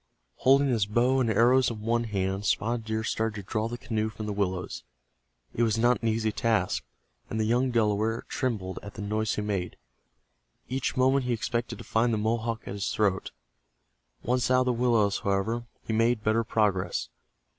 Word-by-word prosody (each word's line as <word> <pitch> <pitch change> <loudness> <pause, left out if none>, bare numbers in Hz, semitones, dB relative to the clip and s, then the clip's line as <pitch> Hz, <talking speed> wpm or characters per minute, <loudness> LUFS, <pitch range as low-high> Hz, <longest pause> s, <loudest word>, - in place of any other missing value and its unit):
Holding 135 +2 +4
his 110 -5 +1
bow 125 +5 +2
and 120 -3 +1
arrows 120 +4 +4
in 110 -3 -6
one 115 +2 0
hand, 100 -1 -2
Spotted 115 +1 0
Deer 110 0 -2
started 110 -1 -1
to 100 - -6
draw 110 0 -1
the 120 +1 -5
canoe 110 -2 -2
from 110 0 -7
the 105 - -2
willows. 95 -2 -2 0.7
It - - -2
was 115 -2 +2
not 120 +2 +3
an 115 - 0
easy 110 0 +1
task, 110 - 0 0.5
and 110 - -3
the - - +2
young 125 +4 +2
Delaware 110 -1 +1
trembled 105 -8 -2
at 100 - -10
the 105 - -5
noise 110 +1 -1
he 105 - -2
made. 95 -4 -3 0.9
Each 130 +1 -2
moment 130 +1 +3
he 125 - 0
expected 120 +1 -2
to - - -9
find 115 +2 +1
the 110 - +1
Mohawk 115 +1 -1
at - - -4
his 100 -1 -2
throat. 100 -3 0 0.9
Once 125 +1 +1
out 130 0 +4
of - - +1
the 125 - +2
willows, 115 -4 +2
however, 110 +5 -1 0.2
he 110 - -2
made 115 0 +2
better 110 +2 +2
progress. 105 -4 0
110 Hz, 190 wpm, -28 LUFS, 105-120 Hz, 0.9 s, Holding